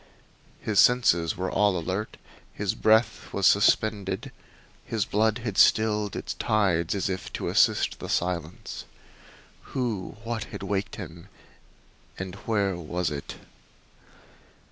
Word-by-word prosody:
His 105 Hz, -3 st, 0 dB
senses 105 Hz, -10 st, +4 dB
were 95 Hz, 0 st, -2 dB
all 100 Hz, -3 st, +3 dB
alert, 95 Hz, +5 st, -3 dB, 0.3 s
his -, -, -2 dB
breath 110 Hz, +1 st, +2 dB
was 100 Hz, -, -1 dB
suspended, 100 Hz, -1 st, +2 dB, 0.5 s
his 110 Hz, -3 st, -1 dB
blood 110 Hz, +1 st, +1 dB
had 105 Hz, -5 st, -2 dB
stilled 105 Hz, -2 st, +3 dB
its -, -, -4 dB
tides 95 Hz, -5 st, +1 dB
as 100 Hz, -, -1 dB
if 95 Hz, -1 st, -4 dB
to -, -, -3 dB
assist -, -, +3 dB
the -, -, -7 dB
silence. 85 Hz, -1 st, -3 dB, 0.9 s
Who 110 Hz, -7 st, -2 dB
what 115 Hz, -2 st, -3 dB
had -, -, -8 dB
waked 100 Hz, 0 st, -2 dB
him, 85 Hz, -4 st, -9 dB, 0.9 s
and 95 Hz, -1 st, -5 dB
where 100 Hz, -3 st, -1 dB
was 85 Hz, 0 st, -2 dB
it? 70 Hz, -1 st, -6 dB
100 Hz, 120 wpm, -26 LUFS, 90-110 Hz, 0.9 s, senses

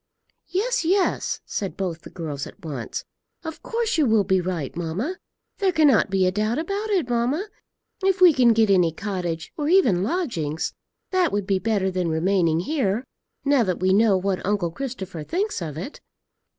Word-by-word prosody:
"Yes, 475 Hz, +5 st, 0 dB
yes," 370 Hz, +3 st, +1 dB
said 195 Hz, -2 st, -4 dB
both 175 Hz, -4 st, -3 dB
the -, -, -11 dB
girls 150 Hz, -5 st, -5 dB
at -, -, -14 dB
once. 140 Hz, -7 st, -5 dB, 0.4 s
"Of 320 Hz, -1 st, -7 dB
course 460 Hz, -5 st, -1 dB
you 295 Hz, -, +4 dB
will 220 Hz, -2 st, +4 dB
be 190 Hz, -1 st, +2 dB
right, 170 Hz, -6 st, -3 dB
mamma; 185 Hz, -, -3 dB, 0.4 s
there 390 Hz, -2 st, +3 dB
cannot 295 Hz, -, +4 dB
be 190 Hz, -1 st, +2 dB
a 185 Hz, -, +3 dB
doubt 215 Hz, +4 st, 0 dB
about 395 Hz, +7 st, -2 dB
it, 370 Hz, -10 st, +1 dB
mamma. 250 Hz, -, 0 dB, 0.6 s
If 385 Hz, -1 st, +2 dB
we 360 Hz, -3 st, +8 dB
can 250 Hz, -4 st, +5 dB
get 220 Hz, -2 st, +3 dB
any 180 Hz, -4 st, +4 dB
cottage, 175 Hz, -3 st, -4 dB
or 300 Hz, -1 st, -1 dB
even 290 Hz, -, +4 dB
lodgings, 190 Hz, -, -2 dB, 0.4 s
that 370 Hz, -3 st, +2 dB
would 205 Hz, -1 st, -1 dB
be 195 Hz, -1 st, +1 dB
better 200 Hz, -1 st, 0 dB
than 180 Hz, -2 st, -1 dB
remaining 165 Hz, 0 st, +2 dB
here, 235 Hz, -, 0 dB, 0.4 s
now 280 Hz, -2 st, +4 dB
that 185 Hz, -6 st, 0 dB
we 185 Hz, +1 st, +3 dB
know 205 Hz, -1 st, +4 dB
what 190 Hz, 0 st, -1 dB
uncle 195 Hz, -4 st, 0 dB
Christopher 190 Hz, -, -5 dB
thinks 385 Hz, -, -2 dB
of 155 Hz, -3 st, -5 dB
it." 190 Hz, -, -7 dB
205 Hz, 175 wpm, -24 LUFS, -, 0.6 s, we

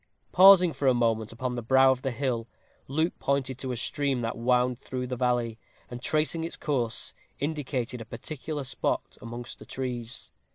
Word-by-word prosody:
Pausing 185 Hz, -2 st, +8 dB
for 135 Hz, +1 st, -1 dB
a 130 Hz, -, +5 dB
moment 115 Hz, -2 st, +1 dB
upon 125 Hz, +2 st, -3 dB
the 120 Hz, -, -3 dB
brow 130 Hz, +3 st, +5 dB
of 130 Hz, -1 st, -1 dB
the 135 Hz, -, -1 dB
hill, 120 Hz, -3 st, -2 dB, 0.4 s
Luke 160 Hz, +5 st, +1 dB
pointed 135 Hz, -2 st, 0 dB
to 130 Hz, -, -3 dB
a 125 Hz, -, -3 dB
stream 135 Hz, +1 st, -1 dB
that 115 Hz, -1 st, -2 dB
wound 125 Hz, +1 st, +2 dB
through 130 Hz, -1 st, -4 dB
the 125 Hz, 0 st, -3 dB
valley, 120 Hz, -2 st, 0 dB, 0.3 s
and, 120 Hz, 0 st, -6 dB
tracing 155 Hz, +3 st, +1 dB
its 165 Hz, -, -5 dB
course, 125 Hz, -7 st, -1 dB, 0.2 s
indicated 135 Hz, -5 st, -2 dB
a -, -, -7 dB
particular 150 Hz, +4 st, -5 dB
spot 130 Hz, -, -2 dB
amongst 120 Hz, +1 st, -7 dB
the -, -, -11 dB
trees. 125 Hz, -2 st, -4 dB
125 Hz, 175 wpm, -28 LUFS, 120-140 Hz, 0.4 s, Pausing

